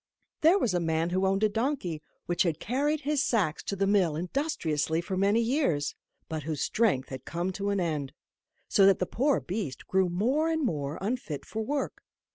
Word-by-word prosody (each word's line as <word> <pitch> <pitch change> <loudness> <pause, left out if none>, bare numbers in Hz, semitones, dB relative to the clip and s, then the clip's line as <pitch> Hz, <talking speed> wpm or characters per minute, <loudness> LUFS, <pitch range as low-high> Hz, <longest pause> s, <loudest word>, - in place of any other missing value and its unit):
There 330 +5 +6
was 240 - +1
a 175 - +2
man 165 0 0
who 190 +1 +2
owned 195 +2 +1
a - - +6
donkey, 220 - -1 0.2
which 175 0 0
had 165 -5 +1
carried 285 - 0
his 290 -1 +1
sacks 190 -10 +1
to 200 - -2
the 195 0 +1
mill 195 -6 +3
industriously 165 - -1
for 180 +3 -3
many 200 +4 +3
years, 225 - +1 0.3
but 160 -1 -3
whose 150 -1 -2
strength 205 - +1
had 130 -1 -7
come 175 +2 -2
to 200 +2 -3
an 200 -1 +1
end, 150 -6 -1 0.6
so 195 -1 +5
that 195 - +5
the 180 - 0
poor 270 +9 +1
beast 180 -8 -4
grew 190 -1 +2
more 255 - +1
and 320 -3 0
more 145 - -2
unfit 200 - -3
for 220 - -4
work. 280 +5 -2
190 Hz, 195 wpm, -29 LUFS, 160-240 Hz, 0.6 s, There